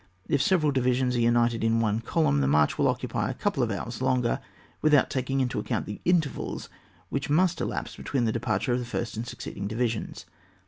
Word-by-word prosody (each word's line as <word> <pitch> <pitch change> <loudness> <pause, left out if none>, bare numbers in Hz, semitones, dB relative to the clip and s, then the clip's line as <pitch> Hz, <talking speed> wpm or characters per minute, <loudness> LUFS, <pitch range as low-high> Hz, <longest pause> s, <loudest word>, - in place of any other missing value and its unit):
If 140 - +2
several 155 -2 +3
divisions 125 -1 +1
are - - +1
united 120 -1 +2
in 115 0 +3
one 110 -1 +1
column, 115 - +1
the 70 - +2
march 75 +1 +3
will - - +4
occupy - - -1
a - - -3
couple - - -1
of - - +1
hours - - -4
longer, 125 -2 +1 0.4
without 150 -3 +4
taking 135 +1 0
into 125 -1 -1
ac - - -6
count 120 -4 -1
the 105 - -7
intervals 165 -6 0 0.4
which 140 +1 -2
must 175 +3 +2
elapse - - -3
between 130 -4 -1
the 110 - +1
departure 120 +2 0
of 125 - +1
the 125 - -4
first 120 -2 -3
and 115 +2 -4
succeeding 100 -3 -6
divisions. 115 +1 -2
125 Hz, 200 wpm, -27 LUFS, 115-135 Hz, 0.4 s, will